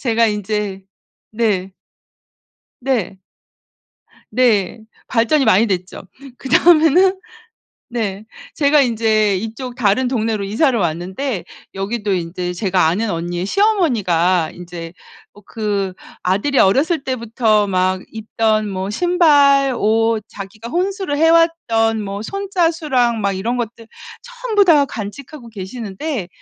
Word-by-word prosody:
제가 230 -2 +2
인제 210 -2 -3 0.5
네. 205 -4 -1 1.1
네. 235 -7 -2 1.1
네. 225 -6 +2 0.3
발전이 255 +5 +2
많이 205 +5 +4
됐죠. 185 -3 -4 0.3
그다음에는 340 +6 +4 0.7
네. 215 -4 -3 0.3
제가 295 0 +3
인제 220 -5 +2
이쪽 225 +5 -6
다른 245 +2 +1
동네로 225 -4 -1
이사를 240 +6 +1
왔는데 185 - -2 0.3
여기도 205 +2 -3
인제 180 0 -4
제가 185 -3 +1
아는 205 +7 0
언니의 175 +1 -3
시어머니가 200 - +1
인제 175 -1 -9 0.4
어 205 - -16
그 205 -3 -2 0.3
아들이 205 +10 0
어렸을 280 - +2
때부터 230 -4 +1
막 185 -1 0
입던 220 -1 -1
뭐 190 0 -4
신발. 285 - +3
옷 225 +1 +1
자기가 210 +3 -9
혼수를 370 -3 -2
해.왔던 325 -9 +2
뭐 200 0 -5
손 395 - -5
자수랑 300 - +1
막 200 -1 0
이런 215 +6 -2
것들 230 -1 -5 0.4
전부 485 -4 0
다 310 -6 +5
간직하고 245 +4 -8
계시는데 210 - -5
225 Hz, 235 characters per minute, -18 LUFS, 195-275 Hz, 1.1 s, 다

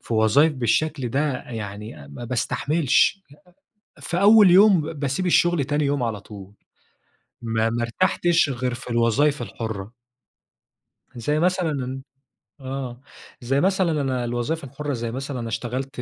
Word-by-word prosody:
في 115 - -4
وظايف 120 +9 +4
بالشكل 130 +3 0
ده 135 +5 0 0.3
يعني 105 -9 -7
ما 70 +12 -8
باستحملش، 145 - +1
ي - - -16 0.6
أ - - -17
في 175 +3 -2
أول 210 -2 +7
يوم، 195 -2 +6
باسيب 145 +4 -2
الشغل 175 -3 +3
تاني 145 +1 0
يوم 140 -2 0
على 110 -3 -2
طول، 100 -1 -12 0.9
ما 115 0 0
ما 120 +1 -2
ارتحتش 170 +5 +1
غير 125 -1 -2
في 125 +1 -9
الوظايف 120 +4 +2
الحُرَّة. 110 0 -6 1.2
زي 150 +6 -1
مثلًا 150 -7 -1 0.6
آه، 130 -2 -6 0.4
زي 135 +4 0
مثلًا 185 -5 +1
أنا 130 -3 -1
الوظايف 120 +7 -2
الحُرَّة، 145 +2 -5
زي 115 -2 -4
مثلًا 135 +1 -5
أنا 115 - -4
اشتغلت 125 +4 -4
130 Hz, 140 wpm, -23 LUFS, 115-150 Hz, 1.2 s, أول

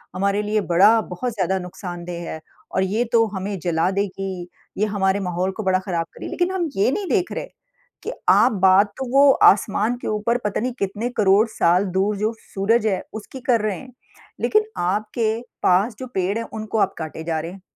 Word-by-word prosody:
हमारे 200 +2 +1
लिए 210 0 0
बड़ा 200 +6 +5
बहुत 230 +7 -4
ज़्यादा 190 -2 0
नुकसानदेह 175 -2 -7
है 160 - -5 0.4
और 190 - +3
ये 210 +6 0
तो 225 -1 +5
हमें 195 0 -4
जला 165 +1 +1
देगी, 195 -2 -3 0.3
ये 210 - +2
हमारे 200 -2 +1
माहौल 180 0 -1
को 215 +3 -6
बड़ा 190 -1 +2
ख़राब 175 -3 -2
कर - - -15
रही। - - -5
लेकिन 355 +1 0
हम 360 -4 -1
ये 200 +6 +2
नहीं 400 +5 -2
देख 370 -4 +1
रहे - - -4 0.6
कि - - -3 0.2
आप 210 +7 +6
बात 190 +2 +6
तो 265 - -3
वो 280 +1 +7 0.2
आसमान 210 +4 +1
के - - -5
ऊपर 215 +3 0
पता 210 - 0
नहीं 250 0 -2
कितने 205 +5 -2
करोड़ 205 +2 +4
साल 180 -2 +2
दूर 200 +2 +1
जो 215 +2 0
सूरज 210 +4 0
है 190 -3 0 0.2
उसकी 260 +5 -11
कर 230 -3 +4
रहे 210 -3 -1
हैं। 255 -2 -13 0.5
लेकिन 430 0 +3
आपके 215 +5 0 0.3
पास 200 +5 +3
जो 260 - -6
पेड़ 190 +3 0
हैं 230 - -3
उनको 220 0 -4
आप - - +2
काटे 160 0 -6
जा 160 -1 -1
रहे 165 +2 -6
हैं। 190 0 -12
200 Hz, 205 wpm, -22 LUFS, 185-220 Hz, 0.6 s, वो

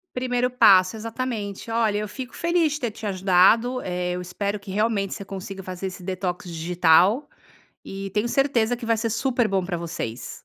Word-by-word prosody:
Primeiro 250 0 0
passo, 190 -5 +5
exatamente. 225 -2 -5
Olha, 225 -2 +1
eu 210 -1 -3
fico 250 +2 -8
feliz 340 -3 +1
de 300 - -5
ter 240 -3 -1
te 215 0 -8
ajudado, 195 +6 +3
eh, 180 0 -2
eu 180 - -3
espero 200 +3 -3
que 200 0 -17
realmente 205 -1 0
você 200 - -7
consiga 195 0 -7
fazer 185 +1 -6
esse 185 -1 -7
detox 185 -1 -3
digital 175 - +3 0.6
e 195 0 -6
tenho 215 +4 0
certeza 245 -4 +1
que 235 - -7
vai 230 0 +2
ser 225 +1 -1
super 240 0 +1
bom 190 -2 0
pra 175 -2 -3
vocês. 165 -9 -5
205 Hz, 185 wpm, -24 LUFS, 185-235 Hz, 0.6 s, passo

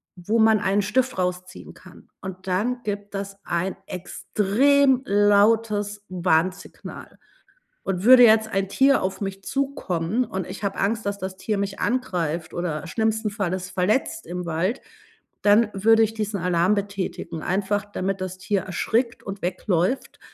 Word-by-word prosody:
wo 210 +6 -1
man 220 -1 +5
einen 200 +1 +1
Stift 255 +5 0
rausziehen 180 0 -4
kann. 180 -1 -16
Und 185 0 -8
dann 225 +7 0
gibt 205 -1 -5
das 195 0 -5
ein 175 +3 -1
extrem 255 +9 +2
lautes 205 0 +2
Warnsignal. 185 +1 -2 0.7
Und 190 -1 -2
würde 250 0 +9
jetzt 220 -1 +6
ein 195 -2 -1
Tier 270 +5 +4
auf 190 0 -2
mich 195 -1 -5
zukommen 245 -7 -1
und 190 -6 -5
ich - - -8
habe 200 -1 -2
Angst, 215 +2 0
dass 200 0 -2
das 190 -1 -5
Tier 210 +2 -2
mich 200 0 -3
angreift 175 -10 -1
oder 175 -1 -3
schlimmsten 220 +2 0
Falles 185 -3 -3
verletzt 215 - 0
im 180 0 -5
Wald, 170 +9 -1 0.6
dann 210 +2 +4
würde 225 +3 +4
ich 220 0 0
diesen 215 -2 -3
Alarm 180 +2 +2
betätigen, 195 -5 -4
einfach 200 +2 0
damit 195 0 -2
das 185 0 -4
Tier 195 +1 -1
erschrickt 230 +7 -1
und 195 -1 -7
wegläuft. 185 +5 -1
200 Hz, 150 wpm, -24 LUFS, 185-220 Hz, 0.7 s, würde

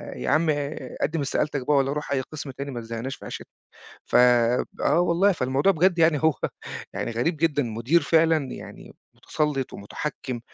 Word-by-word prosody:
"يا - - -3
عم 155 +2 +3
آآ، 145 -3 -3
قدِّم 160 -1 0
استقالتَك 140 -1 -1
بقى، 150 -1 +4
والّا 135 0 +2
رُوح 150 -1 -5
أي 135 -1 +1
قسم 140 0 -7
تاني، 140 +2 -6
ما 120 - -5
تزهِّقناش 115 +3 -5
في - - -13
عيشتنا." - - -7 0.6
فب 125 0 +4 0.2
آه 150 +5 +4
والله. 175 +3 +3
فالموضوع 135 +4 +2
بجد 175 +1 +2
يعني، 160 -2 +4
هو 160 - +5 0.6
يعني - - -3
غريب 125 +9 0
جدًا، 150 -2 +1
مدير 120 +8 +1
فعلًا 160 -3 +2
يعني - - -10 0.2
مُتسلِّط 150 -4 -2
ومتحكم، 125 +3 -5
145 Hz, 170 wpm, -25 LUFS, 130-160 Hz, 0.6 s, هو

